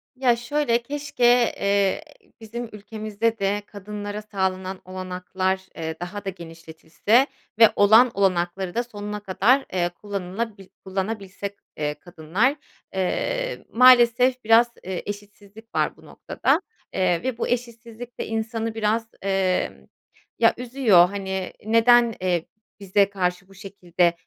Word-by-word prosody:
Ya 250 -2 +3
şöyle, 240 0 0
keşke, 280 +1 -5 0.4
eee, 200 +2 +1 0.4
bizim 230 +1 -6
ülkemizde 215 +1 -3
de 200 +1 0
kadınlara 205 +1 -6
sağlanan 190 -2 -3
olanaklar, 185 0 -3
eee, 160 -1 -4
daha 195 +4 -6
da - - -1
genişletilse 170 - -1 0.3
ve 225 - +9
olan 220 +5 +6
olanakları 185 -1 0
da 240 - +1
sonuna 210 -3 -6
kadar, 210 +7 +2
eee, 175 -2 +1
kullanılabil 200 +2 -5 0.2
kullanabilsek, 200 +1 -4 0.2
eee, 150 -1 -1
kadınlar. 175 - 0 0.4
Eee, - - -2
maalesef 250 +1 +6
biraz, 230 +2 +5
eee, 185 -1 -4
eşitsizlik 205 +2 -10
var - - 0
bu - - -18
noktada, - - 0 0.3
eee, 180 -1 +1
ve 255 -2 -2
bu - - -2
eşitsizlik 235 0 -5
de - - -3
insanı 225 0 -3
biraz, 225 +1 0 0.2
eee, 190 -2 -1 0.5
ya - - +5
üzüyor. 235 -8 +4
Hani, 190 -1 -4
neden, 230 +1 +5
eee 175 -3 0 0.3
bize 200 0 +2
karşı 185 -1 -2
bu 195 - -18
şekilde, 180 -3 0
205 Hz, 125 wpm, -24 LUFS, 185-230 Hz, 0.5 s, ve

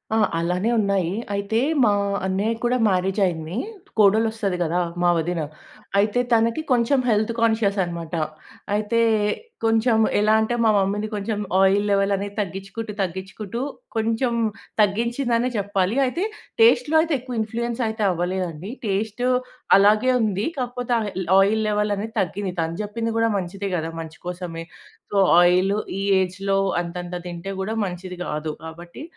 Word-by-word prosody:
ఆ! - - +3 0.2
అలానే 180 +6 0
ఉన్నాయి. 195 -4 +1 0.2
అయితే 200 +3 0 0.2
మా 210 - +5 0.3
అన్నయ్యకి 205 +4 -1
కూడా 245 +1 +2
మ్యారేజ్ 190 +2 0
అయింది. 165 +1 -3 0.4
కోడలొస్తది 215 -1 +3
కదా! 175 +1 +1 0.2
మా 175 - +4
వదిన. 165 0 -1 0.6
అయితే 210 +4 +2
తనకి 230 +5 +2
కొంచెం 250 +2 +3
హెల్త్ 220 0 +2
కాన్షియస్ 220 -3 +2
అన్నమాట. 170 -2 -6 0.6
అయితే, 215 +2 +1 0.7
కొంచెం 225 +1 +3 0.2
ఎలా 215 +1 +3
అంటే 240 +2 0
మా - - +5
మమ్మీని 200 +2 0
కొంచెం 205 +1 -2 0.2
ఆయిల్ 200 +2 +4
లెవెల్ 195 0 +2
అనేది 200 +1 -5
తగ్గించుకుంటూ, 195 +3 -5
తగ్గించుకుంటూ 190 +5 -4 0.3
కొంచెం 225 +2 0 0.5
తగ్గించిందనే 235 +4 +1
చెప్పాలి. 200 0 0
అయితే 335 +9 -1 0.4
టేస్ట్‌లో 450 -8 +5
అయితే 325 0 -1
ఎక్కువ 245 -2 -5
ఇన్‌ఫ్లూయెన్స్ 235 +2 -3
అయితే 220 0 -2
అవ్వలేదండి. 180 +1 -3
టేస్ట్ 210 +4 -2 0.5
అలాగే 215 +5 +4
ఉంది. 210 -1 0
కాపోతే 245 -1 -2
ఆహ్, 215 - -2
ల్ - - -10
ఆయిల్ 215 +3 +3
లెవెల్ 210 0 +1
అనేది 220 +2 -5
తగ్గింది. 190 0 -3
తను 165 +1 -3
జెప్పింది 225 +2 -3
కూడా 230 0 +3
మంచిదే 195 +2 -4
గదా! 165 -1 -2
మంచి 160 -1 -10
కోసమే. 175 -2 -5 0.5
సో, 200 - 0 0.2
ఆయిల్ 185 +3 +4 0.3
ఈ - - -2 0.2
ఏజ్‌లో 195 +1 -1 0.2
అంతంత 175 +1 -6
తింటే 175 +3 -6
గూడా 220 +4 -2
మంచిది 180 0 -7
కాదు. 150 0 -3
కాబట్టి 170 - -9
205 Hz, 140 wpm, -23 LUFS, 180-225 Hz, 0.7 s, మా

